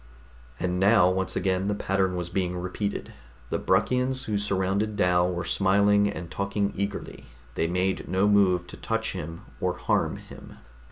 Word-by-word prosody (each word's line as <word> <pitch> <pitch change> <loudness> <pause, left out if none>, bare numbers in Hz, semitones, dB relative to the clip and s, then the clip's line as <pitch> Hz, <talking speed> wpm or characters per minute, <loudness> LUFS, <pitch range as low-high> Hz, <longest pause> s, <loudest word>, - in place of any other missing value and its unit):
And 90 0 -1
now 100 -1 +5
once 95 0 -1
again 95 +1 0
the 105 - 0
pattern 95 -2 0
was 90 -1 -3
being 90 -1 -1
repeated. 95 +3 -4 0.4
The - - 0
Bruckians 125 +7 +1
who 105 - -2
surrounded 100 +1 0
Dal 90 -2 +3
were 85 -1 -3
smiling 100 +2 +3
and 85 -4 -6
talking 100 +4 -1
eagerly; 100 +1 -4 0.3
they 80 - 0
made 90 +2 -1
no 95 +3 +2
move 95 -4 +3
to - - -10
touch 115 0 -2
him 85 -2 -6 0.2
or - - 0
harm - - 0
him. - - -13
95 Hz, 160 wpm, -26 LUFS, 90-100 Hz, 0.4 s, now